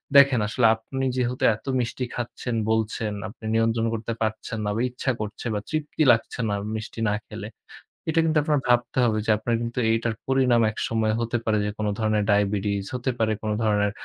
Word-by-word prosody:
দেখেন 140 Hz, -3 st, +7 dB
আসলে 115 Hz, +2 st, +1 dB
আপনি 135 Hz, +4 st, -4 dB
যেহেতু 125 Hz, 0 st, -1 dB
এত -, -, -18 dB
মিষ্টি 125 Hz, +1 st, -2 dB
খাচ্ছেন, 120 Hz, 0 st, -4 dB, 0.2 s
বলছেন, 110 Hz, -1 st, 0 dB
আপনি 110 Hz, +1 st, -12 dB
নিয়ন্ত্রণ 115 Hz, 0 st, +2 dB
করতে 115 Hz, +1 st, -3 dB
পারছেন 110 Hz, +1 st, -2 dB
না 105 Hz, -, 0 dB
বা 115 Hz, -, 0 dB
ইচ্ছা 130 Hz, +1 st, -2 dB
করছে 110 Hz, +3 st, -5 dB
বা 105 Hz, -, 0 dB
তৃপ্তি 155 Hz, 0 st, -2 dB
লাগছে 115 Hz, +1 st, 0 dB
না 100 Hz, -, 0 dB, 0.2 s
মিষ্টি 110 Hz, +1 st, -6 dB
না -, -, +1 dB
খেলে, -, -, -7 dB, 0.6 s
এটা 165 Hz, -, +2 dB
কিন্তু 160 Hz, -1 st, +2 dB
আপনার 150 Hz, -2 st, +2 dB
ভাবতে 120 Hz, +1 st, +2 dB
হবে 110 Hz, -2 st, +1 dB
যে -, -, -3 dB
আপনার 115 Hz, +2 st, -1 dB
কিন্তু 120 Hz, +1 st, -3 dB
এইটার 115 Hz, 0 st, 0 dB
পরিণাম 130 Hz, -3 st, +3 dB
একসময় 110 Hz, 0 st, 0 dB
হতে 115 Hz, +1 st, 0 dB
পারে 110 Hz, -1 st, +2 dB
যে 105 Hz, -, -1 dB
কোন 105 Hz, -1 st, -1 dB
ধরনের 110 Hz, -1 st, +2 dB
diabetes, 100 Hz, -1 st, +1 dB
হতে 125 Hz, +1 st, -1 dB
পারে 110 Hz, -1 st, +2 dB
কোন 110 Hz, -, -2 dB
ধরনের 105 Hz, -1 st, +2 dB
115 Hz, 190 wpm, -25 LUFS, 110-125 Hz, 0.6 s, দেখেন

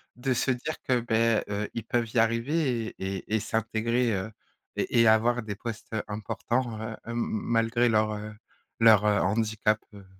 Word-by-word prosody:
De 130 Hz, +1 st, -1 dB
se 130 Hz, -, 0 dB
dire 130 Hz, +5 st, -2 dB
que, 125 Hz, -2 st, +2 dB
beh, 115 Hz, -1 st, +2 dB
heu, 105 Hz, +1 st, -2 dB
ils 115 Hz, -, -4 dB
peuvent 120 Hz, -3 st, -1 dB
y 120 Hz, -, +3 dB
arriver 115 Hz, +1 st, +1 dB
et 95 Hz, -2 st, -5 dB
et 105 Hz, +4 st, -3 dB
et -, -, +2 dB
s'intégrer, 115 Hz, +1 st, 0 dB
heu, 95 Hz, +3 st, -3 dB, 0.5 s
et 115 Hz, -, +2 dB
et 115 Hz, -, +5 dB
avoir 120 Hz, +2 st, +3 dB
des 105 Hz, -2 st, -5 dB
postes, 115 Hz, 0 st, -7 dB
heu, 110 Hz, -, -1 dB
importants, 110 Hz, +2 st, -2 dB
heu 110 Hz, 0 st, -5 dB
hem 115 Hz, +1 st, -4 dB
malgré 115 Hz, +1 st, +1 dB
leur, 110 Hz, -1 st, +2 dB
heu 105 Hz, 0 st, -6 dB, 0.5 s
leur 110 Hz, -2 st, +7 dB
handicap, 105 Hz, +1 st, +2 dB, 0.2 s
heu, 100 Hz, -2 st, -12 dB
115 Hz, 175 wpm, -27 LUFS, 110-120 Hz, 0.5 s, leur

